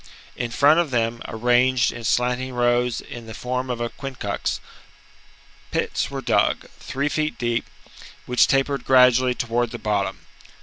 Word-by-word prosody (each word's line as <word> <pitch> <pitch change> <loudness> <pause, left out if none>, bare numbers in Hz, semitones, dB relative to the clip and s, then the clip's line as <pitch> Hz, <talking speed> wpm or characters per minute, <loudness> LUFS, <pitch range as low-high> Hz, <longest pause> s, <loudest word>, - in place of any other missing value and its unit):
^ - - -27 0.3
In 120 -1 -3
front 145 +7 +4
of 170 -3 +1
them, 115 -2 -1
arranged 120 +2 +2
in 115 - -8
slanting 125 +2 0
rows 120 0 +1
in 120 -1 -10
the 110 - -8
form 125 +1 -3
of 120 -1 -2
a 120 0 -2
quincunx, 130 -8 -4 1.1
pits 165 - -1
were 135 -1 -5
dug, - - +1
three 140 +2 -2
feet 155 +2 -1
deep, 120 -1 -1 0.6
which 125 0 +4
tapered 135 +1 +1
gradually 125 -1 +5
towards 120 0 -1
the - - -4
bottom. 105 -3 -2
125 Hz, 150 wpm, -23 LUFS, 120-130 Hz, 1.1 s, gradually